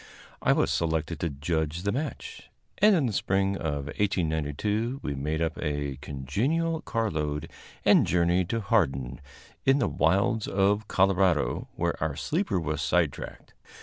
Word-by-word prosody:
I - - +3
was - - +2
selected 80 0 -1
to 85 - -1
judge 80 +3 -2
the 100 - +1
match, 140 +6 -5 0.3
and 210 0 +6
in 155 -6 +2
the 115 - -1
spring 95 +1 +1
of 75 -6 -3
1892 95 - -1
we 75 - -2
made 75 +4 -1
up 80 -1 -2
a 75 -3 -2
congenial 115 - -1
carload 75 -10 -2 0.3
and - - +5
journeyed 90 +1 +2
to 115 0 -1
Hardin, 65 - 0 0.4
in 135 +1 +4
the - - +1
wilds 100 +7 +1
of 100 +2 +1
Colorado, 95 -4 +2
where - - -1
our 80 -2 -1
sleeper 155 - -1
was 75 -2 -2
sidetracked. 80 -2 -1
85 Hz, 145 wpm, -27 LUFS, 75-105 Hz, 0.4 s, and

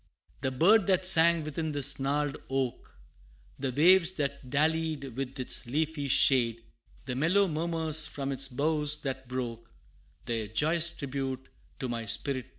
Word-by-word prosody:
The 130 - -1
bird 190 - +3
that 185 -1 +2
sang 170 -2 +5
within 155 +1 -4
this 145 -2 +2
gnarled 145 +1 -1
oak, 135 -2 -3 0.7
The 135 -1 -2
waves 175 +6 +4
that 140 -5 -4
dallied 155 -2 -1
with 135 0 -5
its 130 -1 0
leafy 150 +2 -2
shade, 120 -3 +2 0.4
The 125 - -4
mellow 170 +9 +2
murmurs 160 -1 +2
from 140 -1 -5
its 135 0 0
boughs 150 +2 -1
that 130 -2 -5
broke, 120 -3 -6 0.6
Their 115 -2 -3
joyous 155 +10 +2
tribute 135 -4 -6 0.3
to 130 - -4
my 115 -2 -4
spirit 130 +3 0
paid. - - -27
140 Hz, 150 wpm, -28 LUFS, 130-160 Hz, 0.7 s, sang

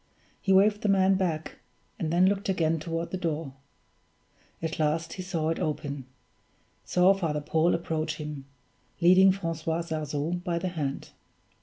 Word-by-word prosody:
He 195 - 0
waved 205 +2 +5
the 210 - 0
man 195 0 +4
back, 170 -5 -2 0.4
and 155 - -2
then 175 +2 +4
looked 200 +1 +1
again 165 -3 +1
toward 165 +2 -4
the 185 - -2
door. 160 -5 -3 1.1
At 160 0 -4
last 155 +2 0
he 185 - -6
saw 170 -4 -2
it 165 - -1
open 145 -3 -3 0.8
saw 180 +2 +4
Father 165 -6 -1
Paul 160 +3 +2
approach 160 -1 -2
him, 150 -3 -7 0.5
leading 185 +2 +6
Francois 165 -3 -2
Sarzeau 155 +1 -3
by 175 -2 -1
the 180 +2 -2
hand. 150 -6 -4
165 Hz, 150 wpm, -28 LUFS, 155-185 Hz, 1.1 s, leading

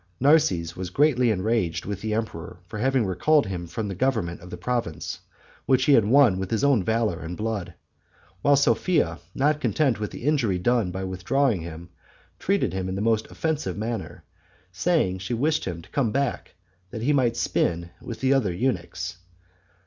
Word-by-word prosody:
Narses 140 - +3
was 90 -1 -5
greatly 130 +1 +3
enraged 95 -4 0
with 100 -1 -4
the 110 -1 -1
emperor, 90 -7 -4
for 105 +4 -7
having 130 0 +2
recalled 145 - +3
him 90 -3 -5
from 105 +5 -4
the 100 - -3
government 100 -6 -1
of 90 - -11
the - - -7
province, 120 -11 -3 0.5
which 130 -1 +3
he 145 - +5
had 115 -6 +5
won 120 -5 +5
with 95 -1 -3
his 115 +3 0
own 140 -8 +4
valor 110 -4 0
and 85 0 -6
blood; 110 -4 -3 0.7
while 145 0 +5
Sophia, 140 - +2 0.2
not 150 +2 +2
content 135 -8 +1
with 105 - -3
the - - -9
injury 130 -10 +1
done 115 +1 +1
by 95 +2 -4
withdrawing 95 +4 0
him, 85 +1 -8 0.5
treated 195 - 0
him 95 0 -2
in 95 - -3
the - - -3
most 110 0 +1
offensive 160 -7 -2
manner, 110 -1 -4 0.5
saying 95 - +1
she 95 +6 -3
wished 150 +6 0
him 85 -3 -5
to - - -17
come 125 -6 +1
back 135 -5 -2 0.3
that 110 +3 -6
he 145 +4 +3
might 120 -4 +2
spin 85 -5 0
with 115 - -7
the 135 +1 +3
other 125 -9 +2
eunuchs. 90 -4 -2
110 Hz, 180 wpm, -25 LUFS, 90-135 Hz, 0.7 s, he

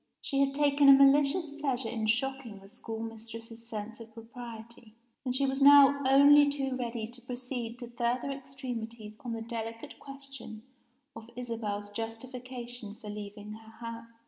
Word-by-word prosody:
She 275 - -2
had 275 0 +2
taken 285 -1 +5
a - - +12
malicious 280 +4 +5
pleasure 265 -5 -1
in 220 -1 -2
shocking 245 -1 -1
the 195 0 -15
schoolmistress's 225 +1 -8
sense 220 0 -6
of 225 -1 -11
propriety 230 -1 -11 0.3
and 255 -1 -2
she 275 +1 +2
was 270 +1 -1
now 280 0 +8
only 285 +2 +7
too 270 -2 -2
ready 235 -3 -3
to 240 +2 -11
proceed 245 -1 -5
to 240 -1 -7
further 240 +3 -1
extremities 245 -5 -7
on 240 -2 -5
the 225 0 -4
delicate 230 +4 -6
question 275 -5 -10 0.5
of 225 0 -10
Isabel's 220 -4 -4
justification 240 0 -7
for 210 -1 -8
leaving 205 0 -8
her 220 +1 -13
house. 230 0 -8
240 Hz, 150 wpm, -30 LUFS, 225-270 Hz, 0.5 s, a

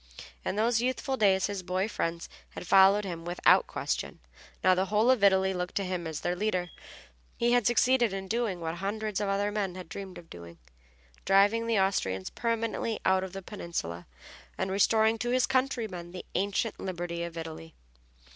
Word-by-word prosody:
In - - -2
those 225 +2 +2
youthful 260 +2 -1
days 195 -5 +3
his 200 -1 -3
boy 185 +2 -1
friends 170 -5 -3 0.3
had - - -7
followed 195 +3 +5
him 170 -3 -5
without 175 +1 +3
question, - - -3 0.5
now 185 - +6
the 185 +1 0
whole 215 +5 +3
of 245 -6 +1
Italy 190 -1 +4
looked 180 0 -4
to 200 - 0
him 180 -3 -3
as 160 -2 -5
their 175 - -1
leader; 180 -3 -1 0.7
he 235 0 +2
had 245 -2 +3
succeeded 240 -1 +3
in 195 0 -5
doing 220 -4 -1
what 165 0 -4
hundreds 210 +2 -3
of 205 - -1
other 200 +1 0
men 200 -3 -2
had 185 -2 -8
dreamed 190 +1 -8
of 165 - -12
doing, 85 - -11 0.7
driving 205 +4 +3
the 225 -3 +2
Austrians 95 - 0
permanently 230 -1 -2
out 190 0 +3
of 190 - -6
the 195 0 -7
peninsula, 165 - -5 0.5
and 190 0 -2
restoring 220 +3 +3
to 240 +3 -2
his 250 0 +3
countrymen 230 -10 -2
the 185 - -7
ancient 200 +3 -1
liberty 175 -2 -4
of 170 0 -5
Italy. 160 0 -8
195 Hz, 180 wpm, -29 LUFS, 180-220 Hz, 0.7 s, now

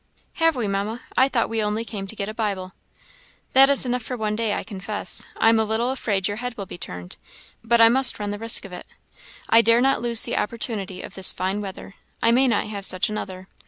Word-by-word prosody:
"Have 325 -1 +4
we, 240 -4 -2
Mamma? 200 +4 -3
I 260 +1 +4
thought 240 -4 0
we 225 -1 -2
only 210 +2 -2
came 200 -4 -6
to 220 - -4
get 200 -2 -4
a 215 - -5
Bible." 195 -4 -3 0.8
"That 270 +1 +7
is 280 -1 +4
enough 250 0 -1
for 250 +2 -6
one 215 -1 -2
day, 220 -2 -1
I - - -4
confess. 205 +1 -1
I 225 - +4
am 225 0 +4
a - - +3
little 220 +3 -1
afraid 205 -7 -1
your 205 - -4
head 245 +1 -5
will 200 - -5
be - - -9
turned, 90 - -6 0.5
but 235 +1 +2
I 230 - +8
must 255 +2 +4
run 205 -1 -4
the 205 - -5
risk 225 -1 +1
of 190 - -11
it. - - -9 0.6
I 230 - +6
dare 230 +1 +4
not 270 +2 +2
lose 235 -1 +5
the - - 0
opportunity 210 -4 -3
of - - -10
this 190 -1 +2
fine 190 +3 -2
weather; 195 0 -8 0.3
I 230 - +3
may 260 +3 +4
not 225 -4 +1
have 205 -2 -6
such 185 +1 0
another. 190 -3 -6
220 Hz, 235 wpm, -23 LUFS, 200-235 Hz, 0.8 s, I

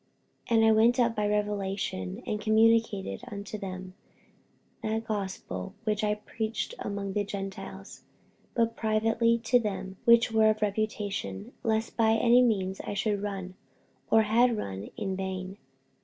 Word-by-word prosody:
48:002:002 230 - +3
And 225 - +5
I 220 - +6
went 230 +3 +4
up 235 -2 +3
by 210 -1 0
revelation, 200 - -2
and 210 0 -2
communicated 220 -2 +2
unto 205 +1 -6
them 185 -2 -6 0.9
that 220 +1 -2
gospel 195 -1 -4
which 215 -1 0
I 210 0 +2
preach 220 - -4
among 200 -1 -4
the 205 - +1
Gentiles, 195 -1 -7 0.5
but 230 -1 +1
privately 225 +1 +2
to 245 +2 +4
them 195 -4 -4
which 235 0 +6
were 220 -1 +5
of 215 0 0
reputation, 200 - -2
lest 220 0 -1
by 220 -1 +4
any 235 +2 +5
means 195 -6 +1
I - - -5
should 205 0 0
run, 195 -3 -4 0.6
or 220 - +5
had 230 +2 +3
run, 100 - -5
in 195 -2 -2
vain. 190 +1 -5
210 Hz, 145 wpm, -29 LUFS, 195-225 Hz, 0.9 s, I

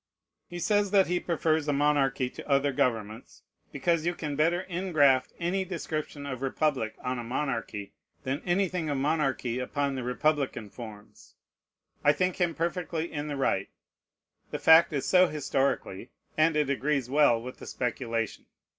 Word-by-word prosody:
He 175 - -7
says 205 +3 +2
that 195 -1 +5
he 180 0 0
prefers 160 -3 0
a 145 - +2
monarchy 140 -3 +2
to - - -10
other 140 0 +3
governments, 115 -5 -2 0.3
because 160 +4 0
you 175 +1 0
can 150 -4 -4
better 170 +5 +1
ingraft 155 -8 +3
any 180 +3 0
description 155 -5 -5
of 130 -3 -5
republic 135 -4 0
on 125 0 -2
a - - -4
monarchy 115 -5 -3 0.3
than 135 +3 -2
anything 180 -3 0
of 145 - -1
monarchy 135 -4 0
upon 140 +2 -1
the 130 - -3
republican 125 -3 -1
forms. 110 -4 -12 0.7
I 145 - +6
think 185 +3 0
him 175 -3 0
perfectly 170 -1 -2
in 150 0 -3
the 145 -1 -4
right. 100 -7 0 0.8
The - - -3
fact 160 +1 +6
is 140 -3 -2
so 185 0 +5
historically, 135 - -1 0.3
and 155 0 +3
it 150 -2 +2
agrees 140 0 0
well 140 -3 +4
with 125 +2 -9
the - - -10
speculation. 115 -3 -3
145 Hz, 155 wpm, -28 LUFS, 130-165 Hz, 0.8 s, I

